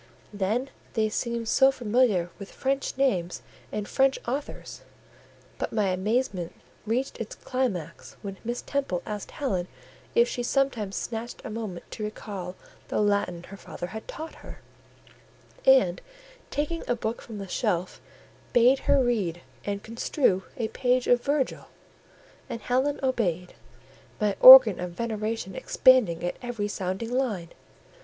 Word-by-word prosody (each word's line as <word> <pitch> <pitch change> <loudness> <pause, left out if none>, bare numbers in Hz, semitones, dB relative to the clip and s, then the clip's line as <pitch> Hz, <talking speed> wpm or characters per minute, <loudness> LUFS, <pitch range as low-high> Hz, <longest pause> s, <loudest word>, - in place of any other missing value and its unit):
Then 215 +7 -1 0.2
they 220 -2 +1
seemed 235 +1 -2
so 270 +4 +5
familiar 225 -8 +1
with 200 - -9
French 270 0 -2
names 185 -11 0 0.3
and 210 -1 -3
French 270 0 +2
authors: 275 +4 -5 0.8
but - - -2
my 210 -3 +1
amazement 190 -1 -1 0.3
reached 250 +5 -1
its 225 - -5
climax 200 - -3
when 195 -1 -6
Miss 240 +1 -3
Temple 270 -11 -2
asked 210 -2 -5
Helen 190 -11 -2 0.5
if 235 +1 +5
she 245 - -3
sometimes 240 -6 0
snatched 235 +1 -5
a - - -5
moment 215 -5 -6
to 215 - -6
recall 200 -4 -6 0.3
the - - -1
Latin 200 -4 +1
her 200 +2 -11
father 175 - -7
had 220 +5 -8
taught 320 +1 -7
her, - - -11 1.1
and - - +5 0.5
taking 300 +3 -2
a 245 - +1
book 225 0 -3
from 220 -3 -8
a 195 - -6
shelf, 180 -3 -1 0.5
bade 245 +3 +5
her 275 -2 +5
read 195 -9 -1 0.2
and 200 0 -3
construe 225 -3 0
a 230 -3 -1
page 250 +1 +1
of 245 -1 +4
Virgil; 280 0 -1 0.8
and 230 - -5
Helen 265 +4 0
obeyed, 180 -9 -1 0.7
my 210 -2 +1
organ 255 -6 +11
of 180 -1 -4
veneration 220 -1 -3
expanding 240 -7 +4
at 175 - -2
every 235 -4 -3
sounding 195 +3 -3
line. 225 -10 -1
225 Hz, 140 wpm, -27 LUFS, 195-255 Hz, 1.1 s, organ